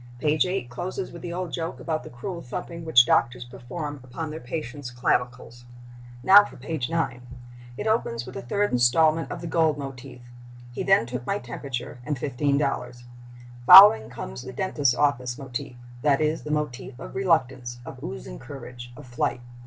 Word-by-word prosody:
Page 155 +6 +2
8 185 -8 -2
closes 180 +10 -5
with 170 - -10
the 175 - -6
old 180 0 -4
joke 165 0 -4
about 155 -2 -2
the - - -10
cruel 170 +8 -6
thumping 170 +6 -6
which 125 -7 +6
doctors 120 +1 +1
perform 145 +5 -7
upon 150 +5 -6
their 155 - -6
patients' 130 -1 -6
clavicles. 125 0 -2 0.6
Now 200 +2 +9
for - - -11
page 135 -1 -4
9. 160 -7 -1 0.6
It - - -4
opens 120 - 0
with 125 0 -10
a - - -4
third 125 -1 0
statement 160 +6 +3
of - - -6
the - - -6
gold 160 -2 +2
motif—"He 120 -2 -10
then 195 -11 +4
took 125 +1 -6
my 200 - 0
temperature 125 -1 -6
and 145 +1 -2
$15." 135 -2 -1 0.6
Following 115 - +10
comes 120 +1 -7
the 130 0 -9
dentist's 140 -4 +1
office 125 -4 0
motif—that 125 +1 -3
is, 155 +1 0
the 150 - -8
motif 135 -4 -3
of - - -9
reluctance, 130 -10 0
of - - -10
oozing - - -7
courage, 120 - -10
of - - -11
flight. 120 0 -2
130 Hz, 165 wpm, -25 LUFS, 120-160 Hz, 0.6 s, Following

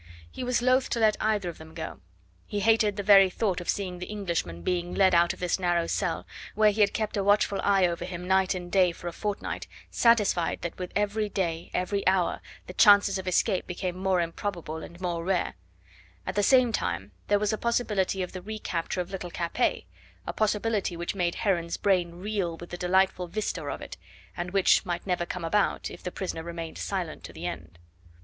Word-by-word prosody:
He - - -6
was 250 -1 0
loath 255 +1 +3
to 235 - -1
let 215 -1 +4
either 210 -4 +1
of 170 - -6
them 160 0 -12
go. 160 - -6 0.5
He 205 - -2
hated 220 -1 +3
the 205 - -3
very 195 -1 +7
thought 185 -2 -1
of 175 - -7
seeing 185 -3 -2
the 180 - -6
Englishman 170 - -3
being 175 -1 -1
led 190 -2 +4
out 170 0 +5
of - - -9
this 180 +1 0
narrow 175 -2 +1
cell, - - -1 0.3
where 215 -1 +5
he 215 +1 -1
had 200 - +5
kept 215 -1 -2
a 200 - +1
watchful 205 -1 +3
eye 195 -2 +4
over 170 0 -1
him 180 0 -6
night 190 0 +3
and 175 -1 -6
day 185 -3 +4
for 175 - -9
a - - -2
fortnight, 205 +2 -4 0.2
satisfied 210 -7 +2
that 170 - -5
with 180 -1 -5
every 210 +1 0
day, 170 -4 -2
every 200 +2 -1
hour, 185 -2 +2 0.2
the - - -9
chances 200 -2 +6
of 190 - -7
escape 185 +2 +1
became 180 0 -3
more 185 -1 +1
improbable 170 -1 -4
and 170 +2 -10
more 170 -2 -2
rare; 185 0 0 0.7
at - - -3
the 205 - +1
same 255 +2 +5
time 95 - -2 0.2
there 205 - +4
was 210 +1 0
the 215 - -1
possibility 210 -5 0
of 180 - -6
the 185 - -7
recapture 185 -4 -3
of 180 +2 -7
little 185 -2 -5
Capet, 170 +8 -1 0.4
a - - -4
possibility 210 -3 0
which 175 0 -3
made 175 -3 0
Heron's 170 -5 0
brain 180 -4 +1
reel 185 -3 -2
with 175 - -10
the - - -3
delightful 180 0 +2
vista 180 -2 -3
of 145 - -4
it, - - -9 0.4
and 175 +1 -3
which 195 0 +4
might 175 -1 -3
never 180 -2 -1
come 180 -2 -4
about 205 +5 +1
if - - -10
the 180 - -5
prisoner 180 -4 -4
remained 165 -1 -6
silent - - -3
to - - -10
the - - -7
end. - - -6
185 Hz, 210 wpm, -27 LUFS, 175-205 Hz, 0.7 s, very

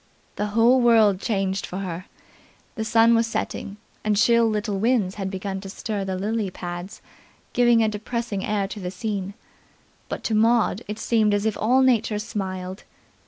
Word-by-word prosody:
The 210 - -1
whole 245 +3 +5
world 220 -5 +5
changed 195 -3 -1
for 180 - -6
her. 185 -2 -5 0.7
The 220 - -3
sun 225 +1 +4
was 230 0 +3
setting 205 -2 -4 0.3
and 210 -1 +1
chill 235 +1 +4
little 210 -2 -2
winds 220 -4 +1
had 190 - -2
begun 190 0 -4
to 195 - -8
stir 200 0 -4
the 190 -1 -3
lily 210 +1 -1
pads, 175 +2 -7 0.5
giving 240 -2 +4
a - - +2
depressing 215 -1 -3
air 205 -2 0
to 210 - -7
the 180 -2 -4
scene, 200 0 -4 0.7
but - - -5
to 225 - -1
Maud 225 -1 +3
it 210 +1 -5
seemed 220 -3 +2
as 205 +1 -1
if 220 - +1
all 255 +4 +3
Nature 230 -4 +2
smiled. 190 -3 -5
210 Hz, 170 wpm, -24 LUFS, 195-230 Hz, 0.7 s, whole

